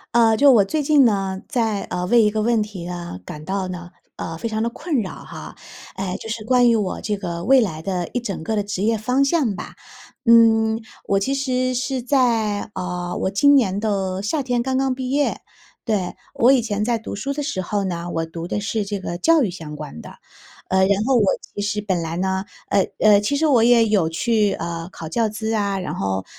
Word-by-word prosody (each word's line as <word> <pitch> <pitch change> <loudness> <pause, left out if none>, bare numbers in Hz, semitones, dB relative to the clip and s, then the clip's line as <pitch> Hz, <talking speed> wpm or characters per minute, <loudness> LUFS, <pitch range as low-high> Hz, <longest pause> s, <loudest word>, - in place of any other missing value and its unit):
呃， 225 -2 +5
就 285 +2 +6
我 230 -6 +6
最 305 +10 -1
近 290 -1 +4
呢， 195 -4 0
在， 225 -6 0
呃， 180 0 -2
为 235 +5 +5
一 210 -1 +3
个 215 0 -1
问 225 -1 +2
题， 190 -5 -8
嗯， 175 - -6
感 150 - -8
到 190 +2 -2
呢， 180 -1 -7 0.3
呃， 165 - -5
非 230 - -3
常 220 0 -2
地 235 - 0
困 285 +2 -2
扰， 190 - -5
哈。 - - -10 0.4
哎。 190 -1 -3
就 225 - -9
是 220 0 -4
关 245 0 +4
于 - - +3
我 200 -4 -2
这 210 -1 -2
个 170 -3 -5
未 265 +5 +5
来 170 -10 -1
的 180 -1 -2
一 245 - -1
整 200 -8 -4
个 220 +7 -2
的 205 - 0
职 200 -2 -4
业 225 +1 +2
方 250 +6 +1
向 275 -8 +1
吧。 - - -8 0.5
嗯， 225 -2 +5 0.3
我 195 0 +2
其 265 +7 -1
实 255 -2 0
是 255 +1 -2
在， 230 -6 +1
呃， 180 0 -4
我 - - +1
今 285 +9 +4
年 200 -8 +2
的 195 -3 -1
夏 285 +9 0
天 245 -3 -1
刚 260 0 -1
刚 265 -1 +1
毕 255 0 -4
业， 290 +1 0 0.4
对。 200 -6 -1 0.2
我 240 - +4
以 260 - +3
前 210 -2 -2
在 235 0 +1
读 220 - -7
书 270 +8 -3
的 295 +1 -3
时 275 -10 -2
候 200 +3 -2
呢， 175 -2 -3
我 165 -1 -2
读 165 +1 -7
的 205 - -2
是 210 0 -2
这 200 -1 -4
个 175 -2 -4
教 320 - +4
育 205 - -1
相 160 -4 -8
关 150 - -8
的。 - - -10 0.6
呃， 190 - +1
然 195 +2 +3
后 265 +1 +3
我 230 - +4 0.3
其 205 - -3
实 205 +1 -1
本 190 -4 -1
来 165 0 -4
呢 190 +1 -1 0.3
呃 195 -2 +2
呃， 210 -1 +5
其 210 +8 0
实 320 - +1
我 260 -7 +4
也 235 -1 +5
有 195 -7 +2
去， 210 +4 +1
呃， 170 0 -5
考 165 - -8
教 220 +7 0
资 220 +1 -3
啊。 200 -3 0
然 185 - -4
后， 95 -1 -2
210 Hz, 245 characters per minute, -21 LUFS, 185-240 Hz, 0.6 s, 就